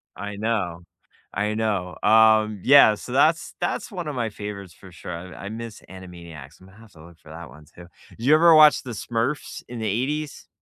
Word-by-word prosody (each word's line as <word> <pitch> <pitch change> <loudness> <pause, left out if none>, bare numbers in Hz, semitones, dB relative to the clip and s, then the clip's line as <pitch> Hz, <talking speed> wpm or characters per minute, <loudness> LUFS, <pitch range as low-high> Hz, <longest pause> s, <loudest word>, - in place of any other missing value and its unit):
I 105 0 -7
know. 100 -6 -3 0.6
I 105 +1 -1
know, 105 -5 -3
um, 110 -1 +4
yeah, 135 -6 +6
so 125 - -11
that's 155 +5 +1
that's 175 - -3
one 175 -5 -6
of 145 - -5
my 115 -3 -2
favorites 100 -4 -8
for 95 - -16
sure, 90 - -9
and 85 0 -8
I 100 - -8
miss 115 -1 -8
Animaniacs, 85 -6 -12
I'm 95 - -17
gonna 100 +4 -19
have 115 -2 -17
to 80 -1 -16
look 85 -1 -18
for 80 - -18
that 80 -1 -10
one 75 +3 -16
too. 85 +3 -16 0.2
Did - - -16
you 145 - +5
ever 165 0 +6
watch 155 -1 +6
The 125 - -8
Smurfs 115 +5 -4
in 120 -1 -8
the 110 - -4
80s? 140 +8 -3
105 Hz, 210 wpm, -23 LUFS, 90-120 Hz, 0.6 s, yeah